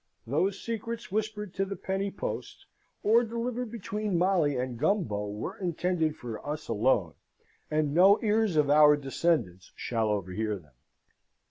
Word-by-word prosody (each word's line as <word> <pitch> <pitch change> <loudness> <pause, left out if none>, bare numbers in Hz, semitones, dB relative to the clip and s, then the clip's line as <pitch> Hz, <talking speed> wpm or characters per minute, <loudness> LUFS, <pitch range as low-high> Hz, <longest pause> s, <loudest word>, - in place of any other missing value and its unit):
Those 175 - 0
secrets 230 -1 -5
whispered 210 -2 -2
to 195 - 0
the 195 0 -4
penny 195 +1 -2
post, 195 - -6 0.4
or 230 +3 +5
delivered 235 +1 -3
between 210 -3 -2
Molly 170 -6 +2
and 125 -2 -3
Gumbo, 150 - 0
were 105 +1 -5
intended 175 -3 0
for 115 -3 -7
us 150 +1 -5
alone, 110 - +1 0.6
and 155 -2 0
no 190 +5 +6
ears 215 -3 +2
of 150 -2 +3
our 150 0 +7
descendants 135 - -1
shall 115 -2 -1
overhear 105 +1 -2
them. 75 -7 -19
160 Hz, 140 wpm, -29 LUFS, 120-205 Hz, 0.6 s, our